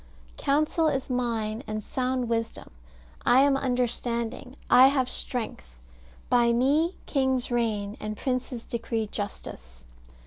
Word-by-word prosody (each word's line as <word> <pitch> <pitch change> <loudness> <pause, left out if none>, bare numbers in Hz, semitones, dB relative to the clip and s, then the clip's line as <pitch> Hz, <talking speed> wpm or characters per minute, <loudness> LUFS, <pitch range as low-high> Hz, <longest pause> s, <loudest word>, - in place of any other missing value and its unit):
"Counsel 305 +3 +2
is 270 -3 -1
mine, 230 -3 -1
and 215 0 -3
sound 255 0 -1
wisdom: 230 0 -3 0.5
I 255 +2 +5
am 280 0 +4
understanding; 245 -1 -1
I 255 +1 +8
have 270 -2 +2
strength. 215 - -5 0.5
By 235 -1 +4
me 290 +9 +2
kings 265 -3 0
reign, 215 -4 -1
and 215 0 -5
princes 255 -2 -3
decree 230 -1 -2
justice. 65 - -7
245 Hz, 115 wpm, -27 LUFS, 225-260 Hz, 0.5 s, I